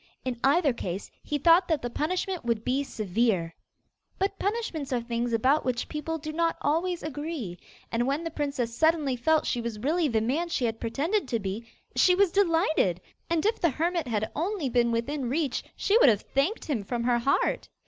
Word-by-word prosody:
In 250 -2 -3
either 285 0 +4
case 190 -4 -5
he 295 - -2
thought 335 +5 +5
that 315 -6 0
the 245 - -2
punishment 360 +6 -2
would 230 -2 -1
be 265 +3 +1
severe. 210 -7 0 0.6
But 395 +1 -1
punishments 400 - -2
are 250 - +1
things 235 0 -2
about 260 +7 +3
which 250 -2 -1
people 315 +1 -3
do 310 0 -6
not 330 +1 +1
always 335 +4 0
agree, 290 - -5 0.3
and 240 +2 0
when 285 +4 0
the 330 - -4
princess 280 -6 -2
suddenly 315 -3 +2
felt 310 +6 +2
she 240 - -1
was 230 -2 -4
really 310 +8 +1
the 225 -5 +1
man 285 +10 -1
she 260 - 0
had 225 -1 -2
pretended 290 - -1
to 235 - 0
be, 210 +2 -5 0.3
she 360 - +5
was 390 -2 +3
delighted, 325 - +2 0.3
and 335 0 +1
if 440 +2 +1
the 340 - +4
hermit 335 +2 -1
had 220 -2 -1
only 335 -2 -1
been 240 -1 +2
within 245 +3 -1
reach 280 -2 -1
she 405 - +1
would 275 - +7
have 210 -3 +2
thanked 280 +11 -1
him 255 -9 -1
from 235 +3 -3
her 240 0 +2
heart. 275 +4 +1
280 Hz, 195 wpm, -27 LUFS, 235-330 Hz, 0.6 s, would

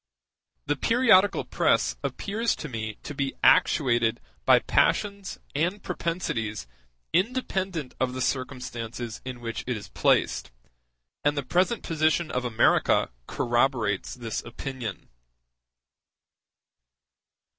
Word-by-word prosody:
The - - +1
periodical 225 - +4
press - - +2
appears 220 +3 -1
to 150 - -6
me 110 -4 -4
to - - -6
be 140 -1 -2
actuated 120 -5 +4 0.3
by - - +7
passions 200 -2 +1 0.2
and 175 +7 -1
propensities 165 - -3 0.5
independent 190 - -1
of 130 -1 0
the 130 - -4
circumstances 125 -3 -4
in 125 -2 -6
which 115 -1 -4
it 125 -3 -1
is 100 - -10
placed, 60 - +1 0.7
and 145 0 +2
the 140 - 0
present 185 - +1
position 160 +1 +1
of 125 0 -2
America 110 - +3 0.2
corroborates 120 -4 0
this 115 -3 -4
opinion. 120 -4 -6
135 Hz, 105 wpm, -26 LUFS, 120-180 Hz, 0.7 s, by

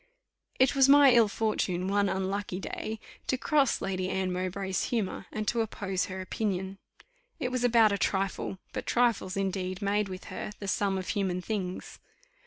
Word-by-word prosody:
It 260 0 +4
was 275 -1 +5
my 285 -1 +8
ill 235 -2 +6
fortune 195 -4 -1
one 200 0 +2
unlucky 190 0 -2
day 220 +2 -5 0.3
to 260 - +1
cross 280 0 +2
Lady 185 -1 -2
Anne 190 -1 -1
Mowbray's 185 +1 -2
humour, 210 -5 -2
and 215 -1 -4
to 235 - +1
oppose 195 -4 -2
her 190 0 -6
opinion. 190 -1 -3 0.6
It 250 - -2
was 250 -1 -1
about 230 -3 +5
a 200 - -1
trifle; 195 0 -1 0.2
but - - -5
trifles, 230 -6 +1
indeed, 190 -1 -2
made, 205 0 0
with 185 0 -7
her, 210 - -5
the 200 - -7
sum 195 0 +1
of 185 - -5
human 190 -4 0
things. 185 -2 -4
195 Hz, 170 wpm, -29 LUFS, 190-225 Hz, 0.6 s, my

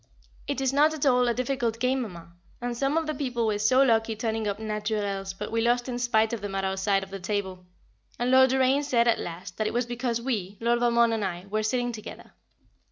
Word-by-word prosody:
It 285 -2 -2
is 265 0 +1
not 300 +3 +4
at 300 - -2
all 250 -2 +4
a 240 - +2
difficult 245 -3 -1
game, 255 +2 +1
Mamma, 170 -7 -8 0.3
and 245 0 -3
some 275 +5 0
of 325 - +1
the 310 - -2
people 250 -5 -2
were 210 -2 0
so 255 +6 +4
lucky 225 -3 +2
turning 220 -1 -2
up 200 - -2
"naturels," 210 -2 -2
but - - -6
we 230 0 +1
lost 240 +1 +1
in 245 -1 -3
spite 225 -2 +2
of 230 - -3
them 200 -1 -5
at 195 0 -1
our 190 0 -1
side 195 0 +1
of 195 - -11
the 195 - -6
table, 190 -2 -4 0.5
and 245 +1 0
Lord 260 0 +6
Doraine 265 +2 +3
said 240 -5 +2
at 230 - +3
last, 175 +2 -7
that 215 - 0
it - - -3
was 245 0 +1
because 240 -1 -2
we 210 -6 -3
Lord 235 +1 +1
Valmond 235 -1 +3
and 220 -2 -1
I 180 -1 -4
were 215 +1 +1
sitting 245 +3 0
together. 220 -2 -10
235 Hz, 235 wpm, -27 LUFS, 205-250 Hz, 0.5 s, Lord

